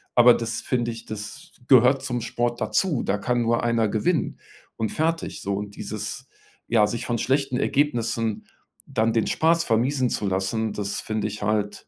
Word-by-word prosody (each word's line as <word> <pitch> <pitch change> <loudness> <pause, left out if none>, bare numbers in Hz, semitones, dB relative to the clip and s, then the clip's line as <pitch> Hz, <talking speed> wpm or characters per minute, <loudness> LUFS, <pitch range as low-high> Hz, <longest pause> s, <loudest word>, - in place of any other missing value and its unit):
Aber, 120 0 +8
das 115 -1 -2
finde 120 -2 -1
ich, 115 0 -9
das 105 -1 -8 0.2
gehört 130 +1 +6
zum 125 -3 -2
Sport 120 +1 -2
dazu, 170 -10 +1
da 100 - 0
kann 120 +4 0
nur 115 0 +1
einer 115 -2 +2
gewinnen 150 - 0 0.4
und 110 -1 -1
fertig 165 +1 -1
so. 100 0 -2
Und 100 0 -5
dieses - - -6 0.4
ja, 110 -3 +4
sich 115 +2 -4
von 120 - -1
schlechten 135 0 +1
Ergebnissen 115 -6 0 0.4
dann 110 +1 +1
den 115 -1 +1
Spaß 165 +1 +2
vermiesen 125 +3 +1
zu 105 - -2
lassen, 95 +4 -1
das 100 -1 -3
finde 110 -1 -2
ich 105 0 -6
halt, 105 0 -1
115 Hz, 170 wpm, -24 LUFS, 110-125 Hz, 0.4 s, Aber